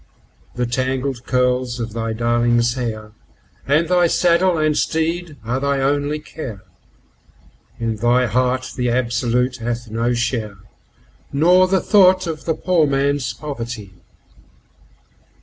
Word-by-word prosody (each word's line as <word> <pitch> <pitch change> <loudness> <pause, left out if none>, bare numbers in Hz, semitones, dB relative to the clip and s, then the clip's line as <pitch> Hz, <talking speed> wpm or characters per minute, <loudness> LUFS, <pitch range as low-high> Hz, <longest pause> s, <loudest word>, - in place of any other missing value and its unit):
The 125 0 -1
tangled 130 +1 -2
curls 125 -1 0
of 115 -2 -4
thy 115 0 -3
darling's 120 +1 +1
hair, 110 -4 -5 0.6
and 150 +4 +2
thy 175 0 +3
saddle 175 +1 +2
and 155 -1 +2
teed 165 0 -1
are 125 +3 -1
thy 140 0 0
only 145 +2 0
care; 145 -9 -8 1.2
In 115 -1 -2
thy 120 +3 +2
heart 125 +2 0
the 125 -1 -1
Absolute 125 +1 0
hath 120 -1 -4
no 115 +2 0
share, 115 -4 -2 0.7
nor 180 +6 +4
the 190 -1 +1
thought 185 -2 +4
of 160 -2 -5
the 160 - 0
poor 170 -2 +2
man's 140 0 0
poverty. 120 -9 -7
130 Hz, 125 wpm, -20 LUFS, 120-155 Hz, 1.2 s, nor